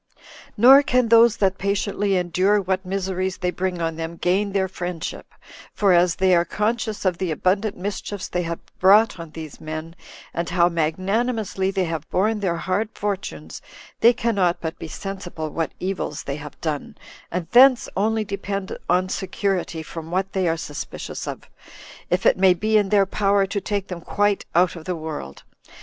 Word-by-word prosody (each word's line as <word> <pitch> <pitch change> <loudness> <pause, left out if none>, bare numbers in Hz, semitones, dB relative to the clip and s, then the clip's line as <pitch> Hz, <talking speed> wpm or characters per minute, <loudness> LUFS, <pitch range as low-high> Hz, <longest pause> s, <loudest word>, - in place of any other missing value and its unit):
Nor 260 +6 +8
can 255 -4 +1
those 230 0 +6
that 190 -2 +1
patiently 200 0 0
endure 185 +4 +2
what 190 -1 -1
miseries 190 0 -2
they 180 -1 -1
bring 180 -1 -2
on 165 -1 -2
them 165 +1 -5
gain 195 +4 +1
their 190 -1 +1
friendship; 180 -2 -6 0.4
for 200 -3 +3
as 175 -1 +4
they 185 -1 +3
are 170 - +4
conscious 215 +3 -2
of 180 -2 +1
the 185 - -1
abundant 195 +6 0
mischiefs 200 +1 -4
they 175 - -2
have 170 -1 -3 0.2
brought 200 +1 +5
on 165 -1 -7
these 155 -1 -9
men, 155 +1 -6 0.4
and 170 0 -2
how 175 -1 +4
magnanimously 190 +5 -1
they 195 -1 0
have 165 -2 -4
borne 210 +3 +1
their 185 -4 0
hard 190 +5 -1
fortunes, 180 - -4 0.4
they 235 - +7
cannot 200 -7 0
but 160 -1 -5
be - - -6
sensible 175 -3 -6
what 165 +1 -2
evils 185 -5 -3
they 140 +1 -4
have 150 -1 -10
done, 155 -3 -4 0.3
and 175 -1 -3
thence 255 0 +6
only 220 +2 +1
depend 200 -1 -4
on 185 +1 +3
security 185 -3 -2
from 165 0 -8
what 190 +2 -1
they 190 -2 +1
are 165 0 +1
suspicious 150 -2 -6
of, - - -6 0.6
if 180 +1 0
it - - +5
may 185 -1 +5
be 215 +5 0
in 205 -2 +3
their 200 -1 +4
power 200 0 +2
to 200 +1 -3
take 200 0 -2
them 180 -2 -6
quite 205 +3 0
out 180 +1 +3
of 165 -2 -10
the 180 - -2
world. 155 - -7
185 Hz, 175 wpm, -23 LUFS, 170-205 Hz, 0.6 s, Nor